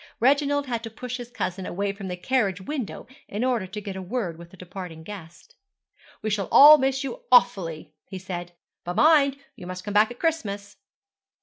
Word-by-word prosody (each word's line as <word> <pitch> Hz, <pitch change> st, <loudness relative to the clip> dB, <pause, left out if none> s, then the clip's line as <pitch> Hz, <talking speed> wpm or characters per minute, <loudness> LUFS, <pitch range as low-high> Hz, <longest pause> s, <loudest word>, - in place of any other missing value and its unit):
Reginald 285 Hz, +3 st, +2 dB
had 235 Hz, -3 st, -3 dB
to 225 Hz, -, -6 dB
push 250 Hz, +3 st, -6 dB
his 240 Hz, -1 st, -8 dB
cousin 190 Hz, -6 st, -4 dB
away 200 Hz, +2 st, -2 dB
from 200 Hz, -1 st, -8 dB
the 180 Hz, -1 st, -4 dB
carriage 200 Hz, -2 st, 0 dB
window, 255 Hz, +2 st, -5 dB, 0.2 s
in 210 Hz, +4 st, -3 dB
order 245 Hz, -7 st, 0 dB
to 210 Hz, +3 st, -6 dB
get 200 Hz, -2 st, -7 dB
a 190 Hz, -, -5 dB
word 185 Hz, -3 st, -3 dB
with 170 Hz, +1 st, -13 dB
the 190 Hz, -, -16 dB
departing 180 Hz, -3 st, -9 dB
guest. 175 Hz, -4 st, -11 dB, 0.7 s
'We 215 Hz, -, -1 dB
shall 200 Hz, -2 st, -1 dB
all 300 Hz, +2 st, +10 dB
miss 265 Hz, +1 st, 0 dB
you 265 Hz, -3 st, -6 dB
awfully,' 175 Hz, -12 st, +3 dB
he 190 Hz, -, -7 dB
said; 175 Hz, -2 st, -6 dB, 0.3 s
'but 175 Hz, +1 st, -4 dB
mind, 285 Hz, -2 st, +5 dB, 0.2 s
you 180 Hz, -, -10 dB
must 185 Hz, 0 st, -6 dB
come 205 Hz, -, -5 dB
back 210 Hz, +1 st, +5 dB
at 245 Hz, -, -9 dB
Christmas.' 205 Hz, -12 st, -2 dB
205 Hz, 195 wpm, -25 LUFS, 185-255 Hz, 0.7 s, all